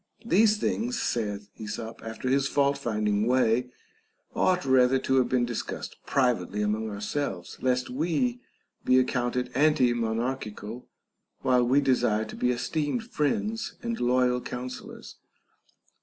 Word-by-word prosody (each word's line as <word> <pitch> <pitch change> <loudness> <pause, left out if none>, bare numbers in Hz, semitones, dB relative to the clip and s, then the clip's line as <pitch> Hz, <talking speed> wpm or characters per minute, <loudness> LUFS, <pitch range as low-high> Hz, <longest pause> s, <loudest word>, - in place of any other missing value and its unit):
These 215 0 +4
things, 240 +3 -1
saith 105 -3 -2
Esop 110 +1 -6
after 115 +3 -5
his 135 +1 +2
fault 140 0 +2
finding 105 -5 0
way, 125 -1 +2 0.6
ought 180 -4 +2
rather 130 0 +4
to 130 0 +1
have 125 -2 +3
been 125 -1 +2
discussed 120 -1 -5
privately 110 -7 +1
among 110 +1 -1
ourselves, 105 - -4
lest 125 0 +1
we 175 - -1 0.4
be 130 - +4
ac 130 - +5
counted 125 0 -1
antimonarchical 120 -4 0 0.5
while 125 -1 +3
we 135 +3 +4
desire 120 -5 +2
to - - -9
be 125 - 0
esteemed 145 - -1
friends 215 - -1
and 235 -1 -2
loyal 125 0 +2
counsellors. 125 +1 -7
125 Hz, 125 wpm, -27 LUFS, 115-140 Hz, 0.6 s, ac